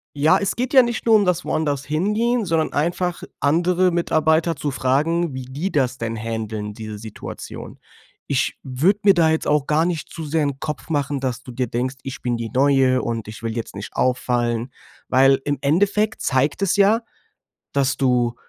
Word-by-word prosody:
Ja, 150 +2 +4
es 200 -2 -1
geht 250 +3 -2
ja 265 - +9
nicht 235 -1 -3
nur 225 -1 +6
um 205 -2 +4
das 180 -1 0
woanders 145 -3 -1
Hingehen, 210 - 0
sondern 165 -2 0
einfach 175 +3 -1 0.2
andere 175 +5 +2
Mitarbeiter 165 -1 +2
zu 145 +1 -3
fragen, 150 +5 0
wie 130 -1 -6
die 145 +10 -4
das 130 -5 0
denn 115 -1 -3
händeln, 110 -2 -4
diese 110 0 -7
Situation. 110 0 -9 0.5
Ich 130 -2 0
würde 155 +10 +1
mir 200 -1 +7
da 165 -3 +3
jetzt 160 0 0
auch 150 -2 +2
gar 155 +2 +2
nicht 170 -3 -3
zu 160 - -7
sehr 155 +1 0
'n 140 -1 -3
Kopf 150 +2 -5
machen, 145 -2 -1
dass 130 -2 -3
du 125 - -9
dir 125 +1 -2
denkst: 125 +4 -2
„Ich 135 0 -7
bin 120 -1 -1
die 115 -1 -4
Neue 135 -1 +3
und 115 -2 -3
ich 110 +1 -9
will 115 -1 -3
jetzt 115 -3 -5
nicht 100 +1 -7
auffallen.“ 120 -1 0 0.4
Weil 135 +1 +4
im 145 0 0
Endeffekt 205 +8 +1
zeigt 140 +6 +1
es 195 -2 +2
ja, 205 +3 +4 0.7
dass 135 -2 +1
du 125 -3 +1
145 Hz, 190 wpm, -21 LUFS, 125-170 Hz, 0.7 s, ja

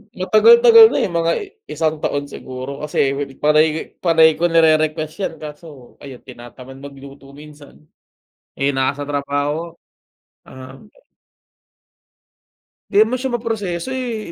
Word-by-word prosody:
Matagal-tagal 455 - +6
na - - -1
eh, - - -2
mga 170 0 0 0.4
isang 155 -1 -2
taon 145 -1 -3
siguro, 130 +2 -8
kasi, 140 -2 0 0.3
panay 155 +1 +1
panay 160 -2 +3
ko 175 - +1
nire-request 155 -1 +1
yan 165 - -6
kaso, 150 -4 -12
ayun, 135 -3 -12
tinatamad 125 +1 -13
magluto 140 0 -13
minsan, 150 0 -16 0.7
eh, 140 +1 -1
nasa 135 +1 -2
trabaho, 145 +3 -3 0.7
ah. 130 +1 -13 2.1
'Di - - -2
naman 245 +3 -4
siya 255 -1 -3
maproseso 205 -6 -4
eh, 240 -7 -5
155 Hz, 115 wpm, -18 LUFS, 140-170 Hz, 2.1 s, Matagal-tagal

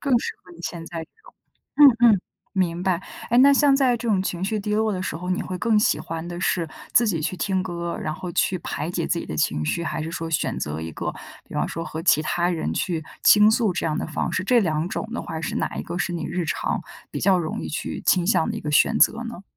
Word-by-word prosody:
更 275 -4 +3
适 460 - -3
合 345 - -15
你 345 - -15
现 170 -2 -5
在 170 -1 -6
这 160 - -10
种。 - - -16 0.5
嗯 240 -5 +7
嗯， 195 - +2 0.3
明 175 -3 0
白。 185 -2 +1 0.3
诶， 240 - +4
那 275 +2 +8
像 280 0 +5
在 260 -3 +3
这 235 0 -4
种 200 -4 +3
情 180 -2 -3
绪 215 +2 -1
低 210 +1 -2
落 220 0 +1
的 185 - -3
时 - - -3
候， 180 +2 -5
你 185 - 0
会 185 - -5
更 225 0 +3
喜 210 - +2
欢 165 0 -5
的 175 0 -6
是 170 -3 0 0.2
自 240 - +5
己 175 -7 0
去 180 +4 -2
听 190 -1 0
歌， 170 -1 -4
然 155 - -2
后 180 0 -6
去 185 +2 +1
排 155 -1 -4
解 170 -2 -2
自 170 - 0
己 - - -7
的 75 - -5
情 75 +1 0
绪？ 170 - -1
还 160 - -3
是 160 - -4
说 165 -1 -4
选 155 - -1
择 75 +1 -3
一 80 0 -5
个， - - -3 0.4
比 - - -11
方 - - 0
说 165 - -4
和 160 0 -6
其 160 -3 +4
他 175 +2 0
人 165 -3 -2
去 165 -4 -2 0.2
倾 210 0 +7
诉 220 -4 +2
这 175 - -2
样 155 - 0
的 - - -2
方 155 - -2
式？ 185 - 0
这 245 +4 +4
两 160 -2 0
种 200 - -3
的 - - -3
话， 160 - -5
是 - - -3
哪 - - -2
一 - - -3
个 175 - -5
是 175 - -1
你 170 - -3
日 175 +1 -2
常， 160 - -2 0.3
比 - - -3
较 190 -2 +4
容 160 -2 -3
易 - - -5
去 155 - -4
倾 180 -2 +3
向 185 -5 +2
的 - - -3
一 - - -5
个 150 - -4
选 - - +4
择 230 +2 +4
呢？ 230 -5 -8
180 Hz, 290 characters per minute, -23 LUFS, 165-215 Hz, 0.5 s, 那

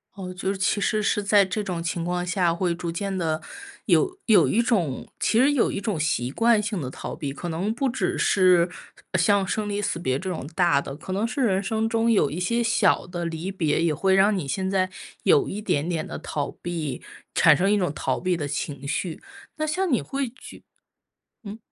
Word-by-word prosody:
哦， 185 -2 -6
就 185 +1 -3
是 - - -6
其 195 +2 +1
实 215 +1 +1
是 205 0 0
在 200 0 +5
这 200 +3 -2
种 175 -3 -3
情 170 0 -2
况 180 0 -1
下， 175 -1 +1
会 175 0 -1
逐 170 -1 -4
渐 195 +3 -3
地 160 -2 -1 0.4
有 375 -2 +3
有 220 - +6
一 230 - +2
种 185 - 0
其 225 - +2
实 280 +3 +5
有 255 - +2
一 200 - -4
种 200 -8 -2
习 125 -5 0
惯 230 - +3
性 210 -3 -3
地 130 - -4
逃 - - -6
避。 140 -2 -4
可 175 +5 -6
能 185 +7 -1
不 270 +1 0
只 245 - -1
是 180 -2 +4 0.5
像 195 +2 +3
生 215 +1 -1
离 205 0 -2
死 195 - -1
别 130 -5 -1
这 185 - -4
种 160 -6 -4
大 175 -6 +3
的， 135 0 -6
可 185 +4 -6
能 210 +4 0
是 270 - -3
人 200 -5 +2
生 220 +2 -1
中 230 0 +2
有 170 -10 +3
一 160 +5 -5
些 235 +6 0
小 230 -6 +2
的 175 -1 -4
离 170 +3 -4
别， 160 -4 0
也 170 - +2
会 190 +5 +2
让 195 +1 +4
你 155 - -4
现 190 +8 -2
在 190 -1 +1 0.4
有 435 -4 +4
一 205 - -4
点 160 -5 -1
点 160 -2 -1
的 - - -6
逃 145 -2 -3
避， 160 -7 -4 0.3
产 155 -4 +6
生 195 +2 +2
一 - - +4
种 180 -6 0
逃 135 -2 -2
避 180 -2 0
的 145 - -3
情 140 -1 -4
绪。 165 +2 -3 0.4
那 310 - -1
像 360 +3 -1
你 245 - +3
会 275 -3 -3
觉 250 - -13 0.8
嗯？ 205 +1 -7
185 Hz, 240 characters per minute, -24 LUFS, 165-215 Hz, 0.8 s, 有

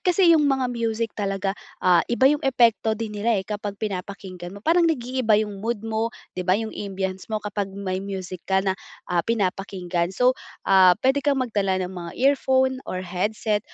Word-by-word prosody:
kasi 360 -2 +4
'yung 300 -3 +4
mga 260 -2 +1
music 230 -1 -1
talaga, 195 -1 -2 0.3
ah, 180 -2 +6
iba 240 +2 +2
'yung 295 +2 +5
epekto 235 -5 +3
din 220 -1 -4
nila, 215 +2 +1
eh, 190 - -2
kapag 205 -1 -5
pinapakinggan 190 -2 -6
mo. 200 - -13
Parang 335 +1 +4
nag-iiba 250 -6 +1
'yung 210 -2 -2
mood 225 0 -3
mo, 225 0 -1 0.2
'di 180 0 -5
ba, 185 - +5
yung 220 0 -4
ambience 190 -1 -4
mo 220 - -1
kapag 205 -1 -2
may 190 -2 -3
music 190 -2 -6
ka 190 0 +2
na, 190 - +2 0.3
ah, 175 -1 +1
pinapakinggan. 185 -4 -1
So, 250 +7 +3 0.3
ah, 185 -2 +6
puwede 270 +2 +3
kang 280 -1 +1
magdala 200 -5 0
ng 180 - -6
mga 170 -2 -7
earphone 260 -1 +3
or 185 0 -3
headset 205 +4 -1
210 Hz, 185 wpm, -24 LUFS, 190-240 Hz, 0.3 s, ah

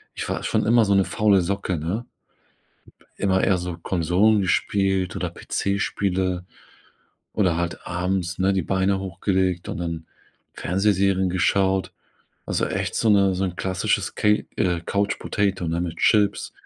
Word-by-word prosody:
Ich - - -4
war - - -3
schon - - 0
immer 115 +1 +5
so 100 - +2
eine 95 -1 +4
faule 105 -3 +3
Socke 95 0 -2
ne? 90 +10 -3 0.9
P - - -26 0.2
immer 95 -1 +2
eher 95 - +3
so 90 -1 -5
Konsolen 90 +5 +2
gespielt 95 0 0
oder - - -2
PC-Spiele. 95 -2 -1 0.9
Oder 90 -6 +2
halt 85 0 -4
abends, 90 0 -2
ne, 95 +1 +2
die 95 - +1
Beine 95 +1 +1
hochgelegt 95 -1 -1
und - - -4
dann 85 -2 -4 0.5
Fernsehserien 95 0 +1
geschaut. 95 +1 +1 0.6
Also, - - 0
echt - - -3
so 115 - +2
'ne 100 -2 +4
so 95 +1 -1
'n 90 -2 -3
klassisches 95 -1 -1
Ca - - +1 0.3
äh, 90 -3 +1
Couch 100 0 0
Potato, 95 -4 -1
ne, 85 +1 -1
mit 85 -1 -5
Chips, 105 -2 +2
95 Hz, 150 wpm, -23 LUFS, 90-100 Hz, 0.9 s, immer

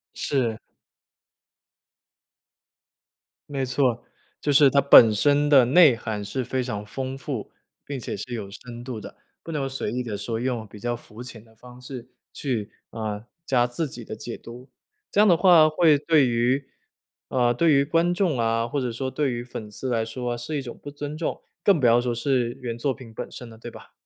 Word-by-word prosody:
是。 120 -6 -1 2.9
没 140 -2 -2
错， 125 -2 0 0.4
就 145 - 0
是 140 0 +7
它 140 - +4
本 120 -5 +8
身 145 +7 +3
的 135 -4 +7
内 145 0 +6
涵 110 -3 -4
是 130 +5 -3
非 130 +2 -2
常 110 -5 -4
丰 130 +4 -5
富， 135 -6 -5 0.3
并 140 -2 -5
且 - - -5
是 125 - -6
有 105 -4 -5
深 120 +3 -10
度 125 -4 -6
的， - - -10 0.3
不 165 - -7
能 140 -4 -2
随 135 - -3
意 125 - -2
地 110 -4 -4
说 115 +2 -3
用 120 -3 -2
比 105 +1 -13
较 120 +3 -2
肤 115 0 -12
浅 120 -3 -10
的 110 0 -23
方 125 +2 -14
式 125 -1 -9 0.2
去， 115 -7 -3 0.2
呃， 110 -1 -5 0.2
加 125 -4 +2
自 145 +6 -2
己 120 -2 -8
的 110 - -7
解 115 +1 -7
读。 125 +2 -12 0.4
这 205 - +4
样 215 - +6
的 175 -4 +5
话 170 -3 +6
会 155 -1 +4
对 150 -3 +3
于 125 +3 +1 0.6
呃， 120 -2 +2
对 160 +6 +3
于 140 0 +4
观 165 +3 +2
众 175 -9 +1
啊， 115 0 +1
或 140 +3 -2
者 125 -2 -2
说 130 +3 -4
对 145 -3 0
于 120 0 -4
粉 115 -3 -8
丝 130 +5 -5
来 115 -2 +1
说 120 +2 -4
是 120 +6 -4
一 140 - -2
种 120 -3 -8
不 - - -8
尊 145 +1 -6
重， 160 +1 -4 0.2
更 195 -5 +4
不 125 - +1
要 120 +1 +5
说 120 -1 -2
是 125 -1 0
原 120 -2 -4
作 130 +3 -1
品 120 -5 -13
本 - - -6
身 125 - -9
的， 115 -1 -14
对 120 - -8
吧？ - - -14
125 Hz, 215 characters per minute, -24 LUFS, 115-140 Hz, 2.9 s, 本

